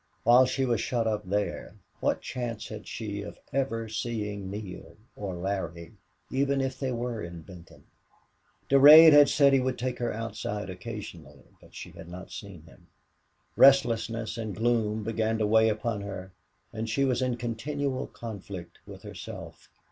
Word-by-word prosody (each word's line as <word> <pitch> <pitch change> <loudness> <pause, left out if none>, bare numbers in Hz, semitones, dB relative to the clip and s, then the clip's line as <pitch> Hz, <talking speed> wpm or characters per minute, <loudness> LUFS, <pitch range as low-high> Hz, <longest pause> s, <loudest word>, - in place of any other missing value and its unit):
While 125 +2 +6
she 135 +1 0
was 120 -2 0
shut 120 -2 -1
up 105 -3 -2
there, 105 +1 -2 0.2
what - - 0
chance 120 -3 -5
had - - -8
she 105 -2 -5
of 100 - -9 0.2
ever 125 -4 -1
seeing 105 -3 -4
Neale 100 0 -8 0.2
or 100 -3 -5
Larry 85 -2 -4 0.4
even 140 +1 +1
if 135 -1 -2
they 135 -2 -2
were 120 -2 -3
in 85 -1 -8
Benton? 90 -2 -14 0.8
Durade 150 +4 +10
had 145 -1 +8
said 140 -1 +4
he 135 - +5
would 130 0 -1
take 125 0 -3
her 120 - -1
outdoors 105 -3 -4
occasionally, 90 - -9 0.2
but - - -18
she - - -8
had 85 - -12
not 90 +2 -9
seen 100 -6 -9
him. 80 - -19 0.7
Restlessness 115 -4 +4
and 110 -4 -4
gloom 110 -2 0
began 110 0 -1
to 110 - +1
weigh 110 +1 +4
upon 110 0 -2
her 95 -2 -7 0.4
and 110 +1 -4
she 135 +5 +1
was 130 -1 0
in 125 -2 0
continual 130 +3 -3
conflict 100 -6 -9
with - - -11
herself. - - -9
110 Hz, 160 wpm, -28 LUFS, 100-125 Hz, 0.8 s, Durade